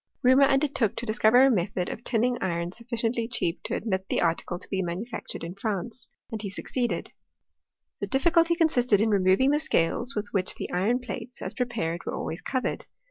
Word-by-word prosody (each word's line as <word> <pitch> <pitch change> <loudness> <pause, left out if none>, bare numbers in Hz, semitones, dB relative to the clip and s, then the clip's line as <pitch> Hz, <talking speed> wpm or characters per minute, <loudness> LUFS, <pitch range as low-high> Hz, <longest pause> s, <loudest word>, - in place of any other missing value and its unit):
Reaumur 260 +2 +6
undertook 270 -6 +1
to 240 - -4
dis 215 0 -3
cover 245 +4 +6
a - - +8
n:et}jod 190 -7 +1
of - - -10
tiunins: 245 +1 +1
iron 170 -1 -1
suScientiv 235 +1 -2
cheap 175 -8 -1
to - - -3
admit 190 -3 -2
tlie - - +1
article 170 +1 0
to - - -14
be 190 -1 -1
manufactured 185 +6 -5
in 170 +1 -5
France 215 +4 -4
— - - -39
and 220 -2 -3
ha 205 - -4
succeeded. 240 +5 -3 0.9
The 200 - -3
difficulty 335 - +3
consisted 250 - +3
in 220 +1 +2
removing 195 +7 +4
the 295 - +3
scales 245 - 0
with 210 -1 -2
which 185 -2 0
the - - -6
iron 220 +8 +1
plates, 250 0 -7
as - - -2
prepared, 210 -9 -2
were - - -2
alwavs 165 - -4
covered. 260 -2 -2
225 Hz, 190 wpm, -27 LUFS, 190-250 Hz, 0.9 s, a